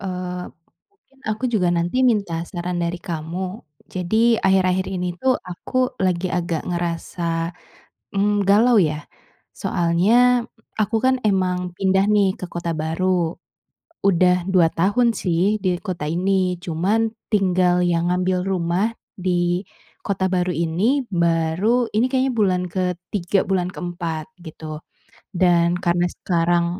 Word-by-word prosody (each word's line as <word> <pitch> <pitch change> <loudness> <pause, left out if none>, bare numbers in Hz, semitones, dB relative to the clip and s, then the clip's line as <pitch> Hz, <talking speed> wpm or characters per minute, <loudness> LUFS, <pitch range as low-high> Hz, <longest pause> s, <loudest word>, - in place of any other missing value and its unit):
eee, 180 -2 -4 0.8
aku 215 +3 -2
juga 185 -6 +2
nanti 175 +9 0
minta 200 -8 +1
saran 175 -1 -4
dari 170 0 -1
kamu. 175 +5 -4 0.3
Jadi, 220 +6 +2
akhir-akhir 190 -1 +2
ini 180 -2 -3
tuh, 260 0 +2
aku 255 +8 -2
lagi 185 0 +1
agak 170 -2 -1
ngerasa, 170 -1 -2 0.6
mmm, 205 0 +2
galau 225 +4 +5
ya. 150 -3 0 0.5
Soalnya 230 +9 +3 0.4
aku 215 +2 +1
kan 260 0 +4
emang 180 -3 0
pindah 190 +1 +2
nih 200 -3 +3
ke - - -4
kota 170 -1 -3
baru, 165 +2 0 0.7
udah 180 -1 +3
2 180 -3 +5
tahun 205 +9 +2
sih 185 +5 +1
di 180 -2 +1
kota 180 -7 -4
ini. 185 +1 +1
Cuman 195 +7 0 0.2
tinggal 180 -3 +3
yang 170 0 +1
ngambil 180 0 0
rumah 190 +4 0 0.2
di 175 0 0 0.4
kota 190 -1 0
baru 180 -1 +1
ini 185 - +1
baru 170 +7 +1
ini 225 +4 +3
kayaknya 265 0 +1
bulan 190 -5 +2
ke-3 180 +1 -1
bulan 185 -2 +1
ke-4 170 -3 -5
gitu 155 -2 -8 0.6
dan 175 -1 +3
karena 175 -1 +1
sekarang 170 -1 +1
180 Hz, 125 wpm, -21 LUFS, 170-200 Hz, 0.8 s, galau